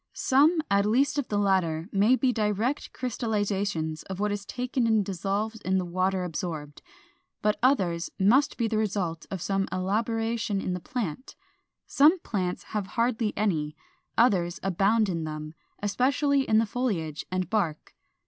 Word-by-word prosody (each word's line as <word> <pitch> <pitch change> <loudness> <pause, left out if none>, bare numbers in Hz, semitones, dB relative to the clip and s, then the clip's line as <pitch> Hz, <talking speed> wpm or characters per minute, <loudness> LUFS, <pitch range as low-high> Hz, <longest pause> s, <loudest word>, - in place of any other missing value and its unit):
Some, 305 +5 +3
at 200 +1 +3
least 275 +6 +2
of 280 - -2
the 205 - -1
latter, 185 -5 +1
may 205 +6 +4
be 255 -1 +1
direct 215 +5 -1
crystallizations 205 -9 -2
of 190 0 -5
what 210 0 0
is 205 0 -4
taken 250 -1 -1
in 220 -2 +3
dissolved 200 +4 -2
in 190 +1 +1
the 185 - -1
water 185 +1 0
absorbed, 155 -4 -5 0.6
but 210 0 +1
others 185 -10 +2
must 245 +10 +3
be 230 - +1
the 220 -1 0
result 190 -6 -2
of 190 -4 -4
some 195 -1 0
elaboration 225 +2 -1
in 185 - -2
the 180 - -3
plant. 245 - -5 0.5
Some 305 +6 +5
plants 185 - -2
have 210 -3 -1
hardly 230 -2 +1
any; 160 -8 0 0.4
others 190 -6 +3
abound 195 +4 +2
in 170 -4 -2
them, 155 0 -6 0.3
especially 270 +6 +1
in 220 - +5
the 225 - +4
foliage 200 - -2
and 185 -1 -1
bark. 180 -7 -2
205 Hz, 155 wpm, -27 LUFS, 185-230 Hz, 0.6 s, Some